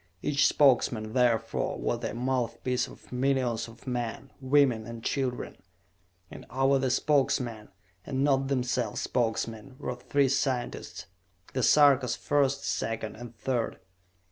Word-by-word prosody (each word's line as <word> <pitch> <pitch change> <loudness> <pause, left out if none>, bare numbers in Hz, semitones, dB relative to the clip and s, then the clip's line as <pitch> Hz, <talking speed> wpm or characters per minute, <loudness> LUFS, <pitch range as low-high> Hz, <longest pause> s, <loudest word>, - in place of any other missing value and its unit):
Each 145 -1 +3
Spokesman, 120 -6 +3
therefore, 115 -3 +1
was 120 - -1
the 115 -2 -4
mouthpiece 125 0 -1
of - - -15
millions 125 -3 0
of 115 0 -15
men, 125 +1 -4
women 130 -5 +3
and 115 -1 -8
children. 130 -3 -2 0.7
And - - -9
over 135 +2 +2
the 130 -1 0
Spokesmen, 125 -5 +1 0.3
and 135 +2 -1
not 135 -1 +2
themselves 125 -4 -1
Spokesmen, 115 +1 -2
were 125 - -4
three 135 +2 +1
scientists: 125 -10 -2 0.5
The 130 - 0
Sarkas, 140 -2 +5
First, 140 -1 +1
Second 110 -1 -2
and 120 +1 -10
Third. 120 -1 -2
125 Hz, 125 wpm, -28 LUFS, 115-135 Hz, 0.7 s, Sarkas